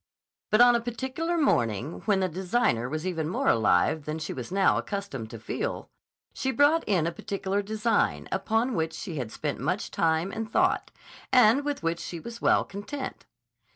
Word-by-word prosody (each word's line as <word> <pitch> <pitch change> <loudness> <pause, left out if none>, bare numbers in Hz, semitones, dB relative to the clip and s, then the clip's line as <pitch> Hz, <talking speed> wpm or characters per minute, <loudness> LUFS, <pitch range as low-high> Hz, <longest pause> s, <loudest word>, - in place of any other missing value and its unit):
But 215 +2 +4
on 245 0 +7
a 235 - +1
particular 265 +8 -3
morning, 120 - +1
when 200 -3 +2
the 185 - +2
designer 180 - 0
was 155 +4 -4
even 165 -4 -2
more - - -1
alive 115 - +3
than 155 +1 -3
she 155 - -4
was 125 +5 -7
now 195 0 +3
accustomed 195 - -5
to 115 - -8
feel, 430 - -4 0.4
she 265 - -2
brought 290 +4 +4
in 180 -6 +2
a 170 - 0
particular 200 +2 -2
design, 215 +2 0
upon 225 +4 0
which 160 -4 -1
she 175 -7 -6
had 120 -5 -4
spent 145 +5 -3
much 180 +9 -2
time 165 +3 +1
and 225 +2 -5
thought, - - +2 0.4
and 250 +2 +5
with 290 -6 -3
which 165 +1 0
she 170 - -6
was 235 +6 -9
well - - +4
content. 260 +8 -7
195 Hz, 180 wpm, -27 LUFS, 160-235 Hz, 0.4 s, on